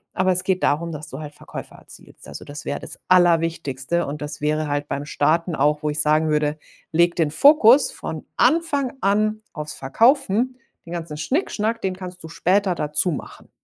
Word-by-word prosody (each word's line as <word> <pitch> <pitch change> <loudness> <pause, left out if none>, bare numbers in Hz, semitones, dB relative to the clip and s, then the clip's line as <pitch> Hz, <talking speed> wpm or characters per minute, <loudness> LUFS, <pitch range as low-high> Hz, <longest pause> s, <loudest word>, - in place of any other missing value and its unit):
Aber 185 -1 +2
es 185 0 +3
geht 185 -1 -1
darum, 165 +3 0
dass 150 0 -6
du 135 - -8
halt 150 -1 -9
Verkäufe - - -10
erzielst. - - -13
Also, 75 - -9
das 145 0 -8
wäre 145 - -3
das - - -8
Allerwichtigste 165 -4 +2
und 150 +1 -6
das 150 0 -6
wäre 155 0 0
halt 145 0 -2
beim 140 +1 -4
Starten 165 +3 0
auch, 150 +2 +1
wo 150 - 0
ich 155 +1 +2
sagen 155 +1 +2
würde: 150 0 0 0.3
„Leg 170 +2 +3
den 160 -3 +1
Fokus 280 - +6
von - - -7
Anfang 295 -6 +1
an 215 +2 +1
auf's 150 0 -6
Verkaufen, 245 - +2 0.3
den 170 - -8
ganzen 165 -3 -5
Schnickschnack, 230 - -1
den 185 -1 -2
kannst 180 -2 -8
du - - -7
später 185 +3 +1
dazu 150 +4 +3
machen.“ 145 - -8
165 Hz, 185 wpm, -22 LUFS, 150-195 Hz, 0.3 s, Fokus